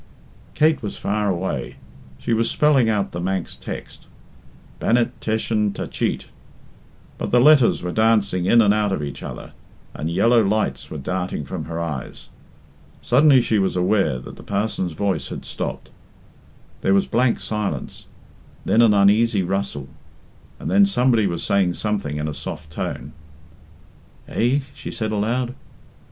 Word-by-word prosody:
Kate 155 Hz, +1 st, +3 dB
was 105 Hz, -3 st, -5 dB
far 105 Hz, 0 st, -1 dB
away. 85 Hz, -9 st, -3 dB, 0.4 s
She 115 Hz, -, -2 dB
was 115 Hz, +1 st, +2 dB
spelling 140 Hz, -6 st, +3 dB
out 105 Hz, -3 st, 0 dB
the 85 Hz, -, -5 dB
Manx 95 Hz, -1 st, -2 dB
text, -, -, -8 dB, 0.7 s
"Bannet 120 Hz, 0 st, +2 dB
T'eshyn 110 Hz, -2 st, 0 dB
Ta -, -, -4 dB
Cheet," -, -, -2 dB, 0.9 s
but -, -, -3 dB
the 125 Hz, -, +4 dB
letters 135 Hz, -, +5 dB
were 90 Hz, -, -2 dB
dancing 105 Hz, -4 st, +2 dB
in 115 Hz, +3 st, +6 dB
and 105 Hz, -1 st, +4 dB
out 105 Hz, -1 st, +1 dB
of 85 Hz, -6 st, -2 dB
each 70 Hz, -1 st, -6 dB
other, -, -, -8 dB, 0.4 s
and 80 Hz, -, -4 dB
yellow 115 Hz, +7 st, +4 dB
lights 100 Hz, -10 st, -1 dB
were 80 Hz, -, -6 dB
darting 90 Hz, +1 st, -3 dB
from 80 Hz, +1 st, -5 dB
her 85 Hz, +1 st, -5 dB
eyes. 75 Hz, -6 st, -5 dB, 0.7 s
Suddenly 135 Hz, +1 st, +5 dB
she 110 Hz, -3 st, +1 dB
was 95 Hz, -1 st, 0 dB
aware 90 Hz, -6 st, +2 dB
that 65 Hz, -, -10 dB
the -, -, -11 dB
parson's 100 Hz, -4 st, -2 dB
voice 100 Hz, +2 st, -1 dB
had -, -, -7 dB
stopped. -, -, -5 dB, 0.9 s
There 95 Hz, -, +3 dB
was 100 Hz, -, +3 dB
blank 120 Hz, +1 st, +1 dB
silence, 105 Hz, -10 st, -4 dB, 0.6 s
then 115 Hz, -, +4 dB
an 110 Hz, -3 st, +5 dB
uneasy 100 Hz, +1 st, +4 dB
rustle, 95 Hz, -7 st, -3 dB, 0.7 s
and -, -, -6 dB
then 200 Hz, +1 st, +6 dB
somebody 125 Hz, -, +2 dB
was 85 Hz, -2 st, -3 dB
saying 95 Hz, -3 st, +2 dB
something 100 Hz, -9 st, -2 dB
in 75 Hz, 0 st, -2 dB
a 75 Hz, -, -3 dB
soft 75 Hz, +1 st, -7 dB
tone. 70 Hz, -2 st, -5 dB, 1.1 s
"Eh?" 130 Hz, +5 st, +1 dB
she -, -, -8 dB
said 110 Hz, -1 st, -3 dB
aloud. 120 Hz, +4 st, -1 dB
100 Hz, 150 wpm, -22 LUFS, 90-115 Hz, 1.1 s, in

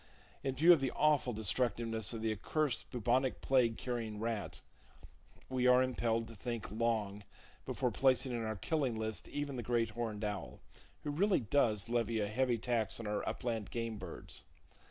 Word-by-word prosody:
In 135 Hz, -1 st, -1 dB
view 165 Hz, +6 st, +8 dB
of 165 Hz, -, +3 dB
the 135 Hz, -, +1 dB
awful 150 Hz, -4 st, +2 dB
destructiveness 115 Hz, 0 st, 0 dB
of 115 Hz, -2 st, -5 dB
the 110 Hz, -, +1 dB
accursed 140 Hz, +6 st, -1 dB
bubonic 125 Hz, +2 st, +1 dB
plague 125 Hz, -4 st, +3 dB
carrying 115 Hz, -4 st, -3 dB
rat, 115 Hz, -2 st, -3 dB, 0.9 s
we 130 Hz, -1 st, +1 dB
are 125 Hz, 0 st, +6 dB
impelled 115 Hz, -3 st, 0 dB
to 115 Hz, -, -10 dB
think 115 Hz, -1 st, -4 dB
long 105 Hz, -2 st, -1 dB, 0.4 s
before -, -, 0 dB
placing 130 Hz, -1 st, +3 dB
in 120 Hz, -2 st, -2 dB
our 110 Hz, 0 st, -2 dB
killing 130 Hz, -, -1 dB
list 110 Hz, 0 st, -3 dB
even 145 Hz, -2 st, -3 dB
the -, -, -2 dB
great 115 Hz, -1 st, 0 dB
horned 110 Hz, -2 st, -3 dB
owl, 95 Hz, -12 st, -4 dB, 0.4 s
who 150 Hz, -, -2 dB
really 190 Hz, +3 st, +2 dB
does 110 Hz, -3 st, +2 dB
[Page -, -, -12 dB
81] -, -, +1 dB
levy 115 Hz, -1 st, +1 dB
a 105 Hz, -, 0 dB
heavy 120 Hz, +3 st, +1 dB
tax 115 Hz, -2 st, -1 dB
on 115 Hz, -, -6 dB
our 105 Hz, 0 st, -1 dB
upland 115 Hz, -4 st, -3 dB
game 115 Hz, -2 st, -3 dB
birds. 90 Hz, -, -8 dB
115 Hz, 175 wpm, -35 LUFS, 110-130 Hz, 0.9 s, view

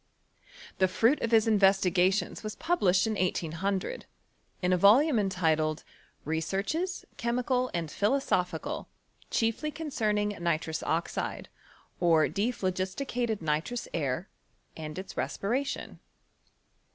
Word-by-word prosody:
The 190 Hz, -, +5 dB
fruit 230 Hz, +9 st, +2 dB
of 230 Hz, -, 0 dB
his 225 Hz, -1 st, +4 dB
investigations 195 Hz, -2 st, +3 dB
was 215 Hz, -1 st, -5 dB
published 195 Hz, -, +2 dB
in 220 Hz, -, 0 dB
1800, 185 Hz, -, -2 dB, 0.6 s
in 180 Hz, 0 st, +3 dB
a -, -, +5 dB
volume 235 Hz, -, +5 dB
entitled, 160 Hz, -5 st, +1 dB, 0.2 s
" -, -, -36 dB
Re 160 Hz, +1 st, -1 dB
searches, 310 Hz, -, -2 dB
Chemical 250 Hz, +2 st, 0 dB
and 165 Hz, -3 st, -3 dB
Philosophical; 195 Hz, -, 0 dB, 0.4 s
chiefly 230 Hz, +7 st, 0 dB
con 315 Hz, 0 st, -6 dB
cerning 210 Hz, -4 st, 0 dB
Nitrous 160 Hz, -2 st, -1 dB
Oxide, 165 Hz, +1 st, -2 dB, 0.5 s
or 165 Hz, -3 st, +4 dB
Dephlogisticated 210 Hz, +1 st, -2 dB
Nitrous 160 Hz, +10 st, -1 dB
Air, 150 Hz, +2 st, -1 dB, 0.5 s
and 155 Hz, -1 st, -7 dB
its 190 Hz, 0 st, -7 dB
Respiration." 255 Hz, +7 st, -2 dB
195 Hz, 110 wpm, -29 LUFS, 170-235 Hz, 0.6 s, The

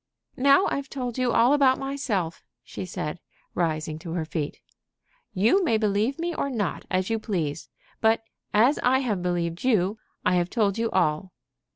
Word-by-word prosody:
"Now 280 Hz, +8 st, +5 dB
I've 275 Hz, -1 st, -3 dB
told 250 Hz, -2 st, -4 dB
you 250 Hz, -1 st, +2 dB
all 240 Hz, +5 st, +4 dB
about 270 Hz, -3 st, +4 dB
myself," 250 Hz, -12 st, -2 dB, 0.2 s
she -, -, -7 dB
said, 165 Hz, -1 st, -4 dB, 0.3 s
rising 155 Hz, -2 st, -1 dB
to 165 Hz, 0 st, -6 dB
her 170 Hz, -2 st, -2 dB
feet. 155 Hz, -2 st, -4 dB, 0.8 s
"You 230 Hz, -, +4 dB
may 230 Hz, -10 st, +2 dB
believe 215 Hz, +5 st, +1 dB
me 340 Hz, +1 st, -2 dB
or 280 Hz, -, -2 dB
not, 210 Hz, -9 st, -2 dB
as 185 Hz, +3 st, 0 dB
you 225 Hz, -, +1 dB
please; 165 Hz, -9 st, -3 dB, 0.3 s
but, 225 Hz, 0 st, +3 dB, 0.3 s
as 240 Hz, +8 st, +4 dB
I 255 Hz, +1 st, +4 dB
have 210 Hz, -8 st, -1 dB
believed 175 Hz, -1 st, -2 dB
you, 215 Hz, -4 st, +2 dB, 0.3 s
I 180 Hz, -, +3 dB
have 175 Hz, 0 st, 0 dB
told 210 Hz, -1 st, +1 dB
you 230 Hz, 0 st, +1 dB
all." 175 Hz, 0 st, 0 dB
210 Hz, 170 wpm, -26 LUFS, 175-255 Hz, 0.8 s, Now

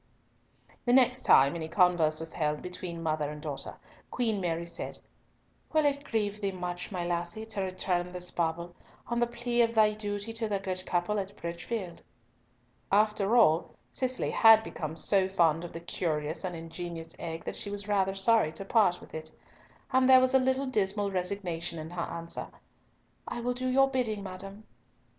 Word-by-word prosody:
The 245 Hz, -, +2 dB
next 255 Hz, 0 st, +4 dB
time 140 Hz, +3 st, +6 dB
any 160 Hz, -2 st, -4 dB
converse 165 Hz, -3 st, +3 dB
was 160 Hz, 0 st, -6 dB
held 150 Hz, -1 st, -1 dB
between 180 Hz, -2 st, -6 dB
mother 155 Hz, -2 st, 0 dB
and 150 Hz, 0 st, -7 dB
daughter, 150 Hz, -2 st, -5 dB, 0.3 s
Queen 225 Hz, -5 st, 0 dB
Mary 170 Hz, -1 st, -1 dB
said, 170 Hz, -, -6 dB, 0.8 s
"Will 310 Hz, -1 st, +3 dB
it 285 Hz, 0 st, +1 dB
grieve 210 Hz, -4 st, -2 dB
thee 200 Hz, -1 st, 0 dB
much, 180 Hz, 0 st, -5 dB
my 180 Hz, -3 st, -3 dB
lassie, 175 Hz, +5 st, -3 dB
to 220 Hz, -3 st, -3 dB
return 185 Hz, -1 st, -1 dB
this 180 Hz, 0 st, -4 dB
bauble, 170 Hz, +1 st, -2 dB, 0.3 s
on 235 Hz, 0 st, -1 dB
the 240 Hz, -, +2 dB
plea 240 Hz, 0 st, 0 dB
of 230 Hz, 0 st, +2 dB
thy 215 Hz, -1 st, +5 dB
duty 205 Hz, +1 st, -4 dB
to 225 Hz, -1 st, -1 dB
the 200 Hz, -, +1 dB
good 185 Hz, -1 st, -4 dB
couple 180 Hz, +4 st, 0 dB
at 200 Hz, +1 st, -6 dB
Bridgefield?" 175 Hz, +2 st, -5 dB, 0.9 s
After 210 Hz, +1 st, +3 dB
all 165 Hz, -8 st, +4 dB, 0.2 s
Cicely 255 Hz, -1 st, -1 dB
had 225 Hz, -1 st, +7 dB
become 155 Hz, -6 st, -5 dB
so 190 Hz, +3 st, +3 dB
fond 165 Hz, -3 st, +2 dB
of 175 Hz, -, -7 dB
the 165 Hz, -, -7 dB
curious 160 Hz, -2 st, -2 dB
and 180 Hz, -2 st, -3 dB
ingenious 165 Hz, 0 st, -7 dB
egg 165 Hz, -1 st, -5 dB
that -, -, -4 dB
she 205 Hz, -, -5 dB
was 205 Hz, 0 st, -4 dB
rather 195 Hz, -2 st, +1 dB
sorry 200 Hz, -4 st, +3 dB
to 195 Hz, +5 st, -5 dB
part 195 Hz, -4 st, +3 dB
with -, -, -15 dB
it, 155 Hz, 0 st, -5 dB, 0.6 s
and 260 Hz, 0 st, +4 dB
there 260 Hz, 0 st, +9 dB
was 255 Hz, 0 st, +2 dB
a 265 Hz, -, +6 dB
little 260 Hz, +1 st, +1 dB
dismal 205 Hz, -4 st, 0 dB
resignation 180 Hz, -3 st, -3 dB
in 160 Hz, +1 st, -7 dB
her 175 Hz, -1 st, -3 dB
answer, 170 Hz, 0 st, -5 dB, 0.8 s
"I -, -, -4 dB
will 245 Hz, +1 st, -1 dB
do 255 Hz, +1 st, -3 dB
your 270 Hz, +1 st, +4 dB
bidding, 235 Hz, -6 st, -1 dB
madam." 195 Hz, +2 st, -8 dB
190 Hz, 180 wpm, -29 LUFS, 170-220 Hz, 0.9 s, there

